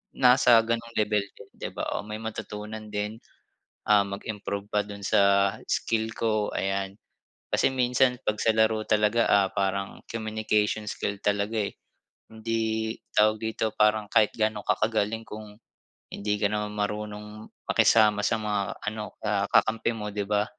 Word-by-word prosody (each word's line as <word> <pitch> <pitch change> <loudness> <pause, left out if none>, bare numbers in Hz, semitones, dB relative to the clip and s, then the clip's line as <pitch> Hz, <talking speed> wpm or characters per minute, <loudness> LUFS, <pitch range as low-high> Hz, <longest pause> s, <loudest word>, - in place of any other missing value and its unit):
nasa 125 -1 +6
ganong 115 0 -3
level 105 -1 +2
din, - - -14
'di - - -4
ba? - - -3
O - - -5
may 105 - -5
matutunan 110 -1 -6
din, 105 +2 -3 0.7
ah, 105 -1 +6
mag-improve 100 0 -5
pa 105 - +2
dun 100 0 -9
sa 100 0 +4
skill 110 0 -1
ko 110 -2 0
ayan. 95 0 -2 0.6
Kasi - - +3
minsan 125 0 +2
'pag 105 0 0
sa 115 - +3
laro 110 0 +3
talaga, 105 +2 +3
ah, 100 -1 +4
parang 100 0 -2
communication 110 -1 -1
skill 100 0 -3
talaga 105 +2 0
eh, - - -26 0.6
hindi 110 0 -2 0.2
tawag 110 +1 +5
dito 110 0 -1
parang 105 0 +3
kahit 105 - +5
gaano 110 -1 0
ka - - +2
kagaling 110 0 -1
kung 105 -1 -9 0.6
hindi 105 0 -1
ka 100 - +2
naman 105 0 -2
marunong 105 +1 -4 0.2
makisama 105 -2 +4
sa 110 - +2
mga 105 -2 -2
ano, 105 0 -5
ah, 100 -2 +1
kakampi 115 +1 +3
mo, 105 -1 -4
'di 100 0 -2
ba? 105 0 +2
105 Hz, 150 wpm, -27 LUFS, 105-110 Hz, 0.7 s, nasa